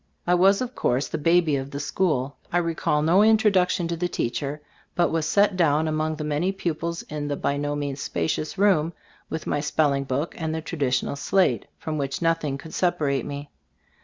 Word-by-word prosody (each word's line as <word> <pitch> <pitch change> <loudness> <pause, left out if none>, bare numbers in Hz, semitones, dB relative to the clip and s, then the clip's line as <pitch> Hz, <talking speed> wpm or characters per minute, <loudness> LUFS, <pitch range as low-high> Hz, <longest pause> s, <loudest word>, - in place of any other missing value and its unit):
I 175 - +3
was, 195 +4 +4
of 250 0 -3
course, 130 - 0
the 160 - -3
baby 165 -1 +3
of 135 0 -5
the 140 - -5
school. 145 -3 0 0.2
I 175 - +2
recall 165 -3 0
no 175 +5 +5
introduction 205 -5 +3
to 170 - -1
the 175 +2 -1
teacher, 140 -1 -3 0.4
but 175 - +2
was 160 -1 0
set 200 +1 +3
down 160 -3 +2
among 155 0 -1
the 150 - -5
many 150 +5 0
pupils 170 -3 -3
in 150 -1 -5
the 145 - -1
by 140 - -1
no 145 0 -2
means 140 -1 -3
spacious 85 - -2
room, 180 -5 +3 0.4
with 160 - -4
my 145 - 0
spelling 145 -2 +1
book 135 +5 -2
and 160 -1 -2
the 160 - -3
traditional 140 -5 -1
slate, 140 - +1
from 155 -1 -4
which 135 -1 -2
nothing 165 -4 0
could 160 +3 -11
separate 150 -6 0
me. 145 0 -6
155 Hz, 190 wpm, -25 LUFS, 145-175 Hz, 0.4 s, no